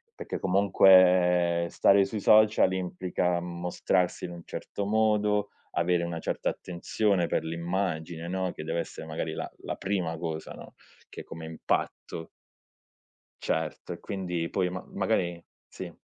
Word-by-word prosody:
perché - - -5
comunque 90 -3 +5
stare 100 0 +5
sui 110 - -4
social 110 -3 +5
implica 90 -1 -1
mostrarsi 90 +1 -1
in 90 - -6
un 85 -1 -8
certo 100 - -5
modo, 105 -1 +2 0.2
avere 85 0 +1
una 85 -1 -4
certa - - -1
attenzione 90 +1 0
per - - 0
l'immagine, 85 0 -3
no, 95 -1 -1
che 75 - -7
deve 80 +2 -2
essere 80 - -6
magari 80 0 -3
la - - -5
la - - -3
prima 90 -5 -2
cosa, 80 -1 -5
no, - - -12 0.4
che - - -8
come 80 0 -9
impatto 80 0 -3 1.1
Certo 80 -1 -2
e - - -10
quindi 90 -4 -3
poi 90 -2 0
ma 90 0 -6
magari 85 -1 0 0.2
sì. - - -8
90 Hz, 140 wpm, -28 LUFS, 85-95 Hz, 1.1 s, comunque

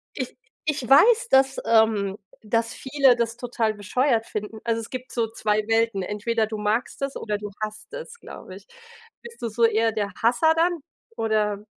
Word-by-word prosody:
ich - - -5 0.3
ich 290 -6 -2
weiß, 445 - +6
dass, 265 0 +4
ähm 220 -3 +3 0.3
das 230 +2 0
viele 265 -2 +3
das 235 -1 -1
total 235 -3 -1
bescheuert 225 +3 0
finden. 215 +1 -5
Also, 230 -1 0
es 225 - -8
gibt 255 0 -6
so 230 -2 0
2 215 -1 0
Welten, 225 -3 +1
entweder 220 +3 -1
du 215 0 -5
magst 215 +6 -1
es, 275 0 -2
oder 210 -2 -3
du 205 0 -7
hasst 215 0 -6
es, 480 -1 -8
glaube - - -11
ich. - - -14 0.6
Bist 470 -1 -12
du 235 - -2
so 230 +2 -1
eher 225 0 +2
der 205 -2 -2
Hasser 250 +8 +4
dann 340 0 +1 0.4
oder 210 -2 0
230 Hz, 180 wpm, -24 LUFS, 215-260 Hz, 0.6 s, weiß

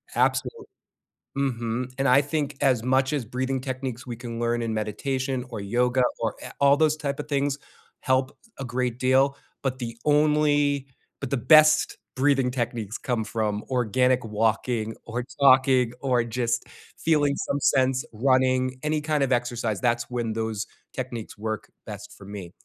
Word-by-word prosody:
Absolutely. 455 -3 0 0.7
Mhm. 125 -2 -2
And 135 0 +1
I 130 +2 +6
think 145 -1 -2
as 130 -5 +3
much 130 +2 +2
as 145 -4 0
breathing 130 +3 -2
techniques 130 -2 -5
we 120 -2 -5
can 120 -1 -6
learn 120 0 0
in 115 -1 -2
meditation, 130 +4 -2
or 110 -4 -5
yoga, 125 +5 +1 0.2
or 115 -2 -1
a - - -7
all 140 0 +6
those 155 0 +3
type 145 -2 -3
of 150 - -5
things 140 -1 0 0.4
help 130 +1 0 0.2
a 135 - -4
great 125 0 -2
deal, 135 +2 +3 0.2
but 130 -1 -2
the 115 -2 -5
only 145 -2 +3 0.3
but 140 - -3
the 140 - 0
best 155 +4 +5 0.2
breathing 135 -1 +2
techniques 120 -3 -3
come 120 -4 -2
from 105 -1 -2
organic 125 0 +2
walking, 110 +1 0
or 120 +2 -3 0.2
talking, 130 -3 +5
or 125 -3 +2
just 120 0 -1 0.3
feeling 145 -3 +2
some 140 - -2
sense 130 -1 +2
running, 130 +2 +2
any 155 0 +1
kind 150 -1 +1
of 135 - -1
exercise. 120 -4 0
That's 120 -1 0
when 120 -3 -2
those 110 -1 -3 0.3
techniques 125 -5 -6
work 110 0 -4
best - - -8
for 100 - -13
me. 100 -3 -8
130 Hz, 160 wpm, -25 LUFS, 115-140 Hz, 0.7 s, I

